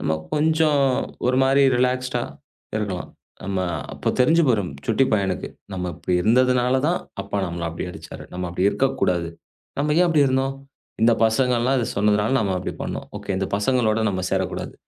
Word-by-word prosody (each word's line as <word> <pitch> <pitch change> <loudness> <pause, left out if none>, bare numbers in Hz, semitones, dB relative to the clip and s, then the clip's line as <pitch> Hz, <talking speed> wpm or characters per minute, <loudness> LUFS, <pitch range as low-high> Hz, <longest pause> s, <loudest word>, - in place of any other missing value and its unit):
நம்ம 80 - -1 0.2
கொஞ்சம் 155 -1 +2 0.5
ஒரு 125 +1 +2
மாரி 135 +1 +4
ரிலாக்ஸ்ட்டா 125 -1 0 0.5
இருக்கலாம். 100 -4 -3 0.4
நம்ம 95 -1 -2 0.3
அப்பத் - - -2
தெரிஞ்சு 165 +6 +5
போயிரும், 100 - +1
சுட்டிப் 115 +2 +2
பையனுக்கு! 95 -4 0 0.2
நம்ம 90 -1 -3
இப்படி 90 - -2
இருந்ததுனால 125 +3 +3
தான், 175 - +1 0.2
அப்பா 100 - -3
நம்மள 85 0 -4
அப்டி 85 - -5
அடிச்சாரு. - - -10
நம்ம 90 0 -4
அப்படி 90 +2 0
இருக்கக் 135 0 0
கூடாது. 85 -2 +1 0.5
நம்ம 150 +1 +1
ஏன் 180 - +5
அப்படி 150 -4 +4
இருந்தோம்? 135 +1 0 0.5
இந்தப் 115 0 +4
பசங்கலாம் 125 +2 +2
அத 115 - -1
சொன்னதுனால, 105 +2 +2
நம்ம 100 -5 0
அப்படி 90 - -5
பண்ணோம். - - -5
ஓகே! - - -8
இந்தப் 95 +1 -2
பசங்களோட 115 0 +1
நம்ம 95 -2 -2
சேரக் - - 0
கூடாது. - - -6
120 Hz, 165 wpm, -23 LUFS, 95-130 Hz, 0.5 s, தெரிஞ்சு